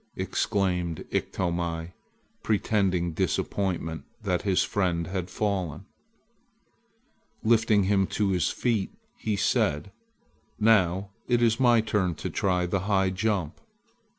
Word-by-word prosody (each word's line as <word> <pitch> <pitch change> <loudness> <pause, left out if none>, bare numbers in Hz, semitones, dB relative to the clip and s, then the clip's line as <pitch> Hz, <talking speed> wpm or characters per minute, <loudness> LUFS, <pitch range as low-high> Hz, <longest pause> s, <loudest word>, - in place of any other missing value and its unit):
exclaimed 90 -4 -1
Iktomi, 85 -2 -2 0.5
pretending 95 -5 +1
disappointment 80 -2 -1 0.2
that 90 -4 0
his 95 -3 +2
friend 90 -4 0
had 90 +1 -4
fallen. 95 -3 -2 1.6
Lifting 110 -2 +4
him 95 0 +2
to 105 -2 0
his 90 -5 +1
feet, 115 -6 -1 0.3
he 110 -2 -1
said: 95 -3 +1 0.7
"Now 100 -3 +3 0.2
it 120 -1 +2
is 115 -1 +3
my 120 -3 +5
turn 100 -6 0
to - - -5
try 90 -2 +1
the 95 +2 0
high 95 -2 +3
jump!" 95 -4 -1
95 Hz, 110 wpm, -27 LUFS, 90-105 Hz, 1.6 s, my